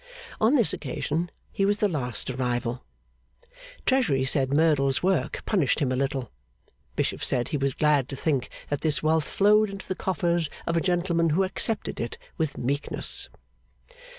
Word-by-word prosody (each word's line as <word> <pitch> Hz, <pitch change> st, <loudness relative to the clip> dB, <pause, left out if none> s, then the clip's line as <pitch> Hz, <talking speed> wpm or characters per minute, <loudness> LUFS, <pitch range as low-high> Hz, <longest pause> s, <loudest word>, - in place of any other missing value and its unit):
On 225 Hz, +7 st, +4 dB
this 235 Hz, -7 st, +3 dB
occasion, 160 Hz, +4 st, -3 dB, 0.2 s
he 195 Hz, -, -1 dB
was 205 Hz, +1 st, +2 dB
the 215 Hz, -2 st, +2 dB
last 130 Hz, -, -1 dB
arrival. 125 Hz, -1 st, -2 dB, 1.0 s
Treasury 225 Hz, -, +2 dB
said 130 Hz, 0 st, +2 dB
Merdle's 140 Hz, -3 st, +2 dB
work 180 Hz, -8 st, 0 dB
punished 175 Hz, -, +1 dB
him 135 Hz, -5 st, 0 dB
a -, -, +1 dB
little. 135 Hz, -1 st, -2 dB, 0.6 s
Bishop -, -, -1 dB
said 120 Hz, -1 st, +1 dB
he 150 Hz, -, -1 dB
was 135 Hz, -1 st, -1 dB
glad 150 Hz, -4 st, +2 dB
to 135 Hz, -, -5 dB
think 135 Hz, -3 st, -1 dB, 0.2 s
that 145 Hz, -, -1 dB
this 155 Hz, -2 st, +1 dB
wealth 155 Hz, 0 st, +2 dB
flowed 210 Hz, +1 st, +3 dB
into 195 Hz, -1 st, -8 dB
the 185 Hz, -, -1 dB
coffers 175 Hz, -4 st, 0 dB, 0.2 s
of 170 Hz, -, -1 dB
a 165 Hz, -, +2 dB
gentleman 175 Hz, -2 st, +1 dB
who 170 Hz, +6 st, +2 dB
accepted 205 Hz, +3 st, -1 dB
it 115 Hz, -, -4 dB, 0.2 s
with 160 Hz, -3 st, -2 dB
meekness. 140 Hz, +4 st, +1 dB
155 Hz, 160 wpm, -26 LUFS, 135-185 Hz, 1.0 s, On